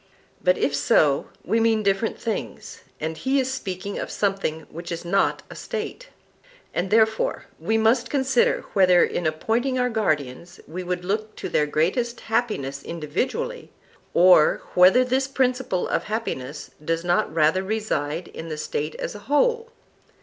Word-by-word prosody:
But, - - +3
if 440 - 0
so, - - +3 0.2
we 225 - +2
mean 225 -1 +2
different 200 +2 0
things, 225 -3 -5 0.2
and 160 +1 -3
he 265 +10 +1
is 265 0 -1
speaking 200 -5 -5
of - - -4
something 195 -6 -1
which 170 +3 -9
is 170 +1 -5
not 195 +3 +1
a - - -11
State. 480 +1 -6 0.6
And 180 +2 -1
therefore 220 - +2
we 220 - 0
must 230 +2 +2
consider 265 -3 +2
whether 180 -3 +5
in 170 - -1
appointing 230 +12 0
our 250 -1 +1
guardians 155 - -2
we 175 +4 -5
would 180 0 -3
look 215 +3 -2
to - - -5
their 150 - +2
greatest 195 - 0
happiness 145 - -1
individually, 255 - -3 0.5
or 175 -3 +6
whether 190 +8 +6
this 260 +1 +1
principle 255 -7 0
of - - -1
happiness 150 - -4
does 165 +1 -1
not 175 0 +1
rather 160 +3 +3
reside 185 -6 -2
in 165 - -8
the 155 - -4
State 150 0 -3
as - - -4
a 205 - -9
whole. 465 +10 +2
200 Hz, 155 wpm, -24 LUFS, 170-250 Hz, 0.6 s, or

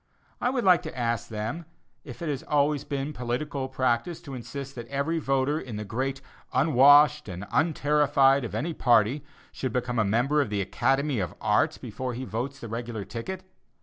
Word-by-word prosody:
I 245 - +2
would 250 -2 -1
like 180 -2 +5
to 155 - -8
ask 115 -1 -1
them 110 +10 -4 0.4
if 125 +2 -9
it - - -3
has 140 -3 -2
always 145 -1 +1
been 140 +1 -3
political 130 +2 -3
practice 130 +5 0
to 140 - -9
insist 140 +2 -7
that 120 -2 -8
every 140 +5 -1
voter 135 +1 +1
in 120 -8 -7
the 105 0 -5
great 130 +6 -3 0.3
"unwashed" 145 0 +5
and 90 +2 -6
"unterrified" 145 -3 +3
of 120 - -5
any 165 +2 -2
party 120 +1 +3 0.3
should 130 - -3
become 125 -1 -1
a - - +4
member 125 +9 +2
of 140 - -2
the 105 -1 -1
Academy 135 +7 0
of 90 - -3
Arts - - +2
before 130 -2 -5
he 130 - -5
votes 125 +5 -4
the 115 - -7
"regular" 115 -2 -5
ticket? 120 - -6
135 Hz, 180 wpm, -27 LUFS, 120-145 Hz, 0.4 s, like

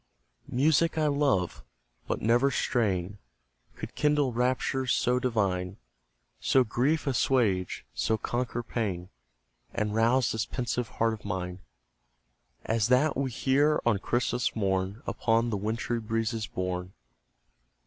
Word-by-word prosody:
Music 155 +5 +2
I 155 - +2
love 140 -11 +1 0.4
but - - -2
never 120 +5 +4
strain 100 -7 0 0.6
Could - - -7
kindle 150 -4 +2
raptures 130 +2 0
so 125 +1 +2
divine, 100 -6 -1 0.6
So 130 - +4
grief 130 +7 0
assuage, 120 -8 +1
so 110 - 0
conquer 120 +1 -2
pain, 95 -7 -3 0.7
And 105 -1 -1
rouse 115 +3 +3
this 110 - -2
pensive 120 -2 -2
heart 115 0 +2
of 110 - -8
mine 90 0 -4 1.1
As 110 -2 +1
that 130 +5 +3
we 135 0 -1
hear 140 +5 +2
on 115 -4 +3
Christmas 120 +2 0
morn, 95 +2 -1
Upon 115 +1 +1
the 105 - 0
wintry 115 +3 -2
breezes 115 0 -2
borne. 90 0 -4
115 Hz, 120 wpm, -28 LUFS, 105-130 Hz, 1.1 s, never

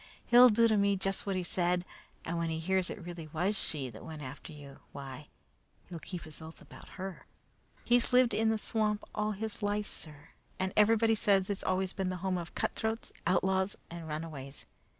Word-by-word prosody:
He'll 245 +1 +9
do 230 +1 +5
to 220 -2 +3
me 200 0 +3
just 195 +1 -1
what 195 - 0
he 185 - -1
said, 175 0 +1 0.4
and 170 0 -2
when 165 -1 0
he 160 - -1
hears 185 +3 +1
it 185 - -7
really 170 -2 -7
was 175 +7 0
she 145 -8 0
that 110 - -11
went 155 -2 -7
after 135 +4 -8
you, 145 -2 -11
why, 140 +1 -8 0.6
he'll 170 -2 -7
keep 175 0 -6
his 155 0 -7
oath 160 +1 -10
about - - -13
her. 190 -1 -6 0.6
"He's 240 +1 +4
lived 250 -1 +5
in 220 0 +3
the 220 - +2
swamp 215 -1 0
all 210 0 0
his 220 +2 -5
life, 205 0 0
sir, 150 0 -10 0.3
and 190 0 -1
everybody 225 +1 +5
says 200 -2 +3
it's 200 - -3
always 185 0 0
been 190 -2 -1
the 185 - -2
home 185 -1 +1
of 170 0 -8
cutthroats, 220 +1 -2 0.2
outlaws, 190 +2 +2
and 170 -1 -7
runaways. 150 -3 -6
185 Hz, 195 wpm, -32 LUFS, 160-210 Hz, 0.6 s, He'll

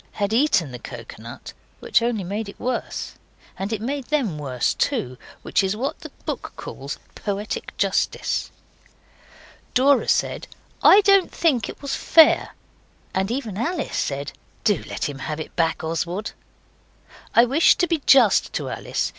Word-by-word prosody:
had 205 +1 -1
eaten 225 - +2
the 125 - -7
coconut, 115 -2 -9 0.3
which - - +2
only 230 -4 0
made 200 +4 -4
it - - -12
worse. 250 -1 -3 0.4
And 195 +3 -4
it 220 -2 -2
made 275 +2 -3
them 240 - -1
worse 130 -4 -1
too 125 0 -1 0.3
which - - +1
is 190 +2 0
what 265 +5 -3
the - - -9 0.2
book - - -4
calls - - -7 0.2
poetic 205 0 -4
justice. - - 0 1.3
Dora 270 +2 +4
said, - - 0 0.3
'I 405 - +8
don't 395 -2 +4
think 260 -10 +1
it - - -10
was 280 - -3
fair,' 320 -1 +5 0.6
and 190 +1 0
even 230 -5 -3
Alice 320 +3 -2
said 140 0 -2 0.3
'Do 205 -7 +2
let - - -2
him 140 -2 -7
have 150 +3 -4
it 155 - -7
back, 165 -1 0
Oswald.' 170 +6 -3 1.0
I 235 - +7
wish 280 +7 +5
to 355 - +2
be 330 -3 -1
just 245 -7 +5
to - - -3
Alice. - - -2
215 Hz, 155 wpm, -23 LUFS, 165-275 Hz, 1.3 s, I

